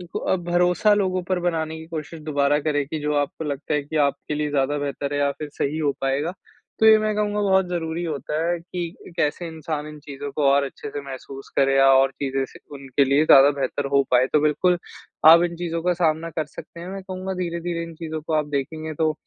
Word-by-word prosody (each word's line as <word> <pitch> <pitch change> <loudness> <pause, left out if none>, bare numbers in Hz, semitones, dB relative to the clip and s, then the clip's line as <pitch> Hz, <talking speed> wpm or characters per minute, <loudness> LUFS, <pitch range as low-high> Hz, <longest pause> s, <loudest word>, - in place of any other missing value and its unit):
इन 180 - -9 0.2
अ, 190 - +3
ब 175 - -8
भरोसा 180 +4 +3
लोगों 185 -3 0
पर 185 -1 +1
बनाने 160 -2 -1
की 160 - -10
कोशिश 160 0 -6
दोबारा 145 -1 +1
करें 145 -1 0
की 155 +1 -4
जो 150 0 0
आपको 145 +2 -2
लगता 150 +1 -3
है 150 - +1
कि 150 +3 -6
आपके 140 +1 -4
लिए 150 0 -1
ज़्यादा 145 +1 +1
बेहतर 145 0 -3
है - - 0
या 140 0 +2
फिर 150 - -5
सही 145 +2 -2
हो 150 -2 +1
पाएगा। 135 +5 0 0.5
तो 220 - +6
ये 220 0 +8
मैं 215 0 0
कहूँगा 210 0 0
बहुत 190 -2 +3
ज़रूरी 170 -1 -3
होता 150 -2 -3
है 175 0 0
कि 175 0 -7
कैसे 170 +2 0
इंसान 155 -2 -5
इन 150 0 -10
चीज़ों 145 0 -7
को 150 - +1
और 140 0 +3
अच्छे 140 +1 -7
से 145 - -5
महसूस 135 0 -9
करें 135 0 +3
या 135 0 +6
और 135 0 +4
चीज़ें 135 -1 0
से - - -15 0.2
उनके 135 0 +1
लिए 140 +3 +3
ज़्यादा 140 0 +8
बेहतर 140 +2 -1
हो 140 0 +5
पाएँ, 125 0 +4
तो 150 - +4
बिल्कुल 155 +4 +2 0.5
आप 170 +1 +8
इन 170 -1 -3
चीज़ों 165 -1 -3
का 180 +1 +2
सामना 165 -1 0
कर 160 -1 -2
सकते 170 +3 -11
हैं 175 - -7
मैं 195 0 -6
कहूँगा 185 0 -5
धीरे-धीरे 170 -1 -3
इन 165 0 -10
चीज़ों 160 -1 -5
को 155 +1 -3
आप 150 - 0
देखेंगे 155 +3 -4
तो 155 +1 +1
155 Hz, 235 wpm, -23 LUFS, 145-175 Hz, 0.5 s, ये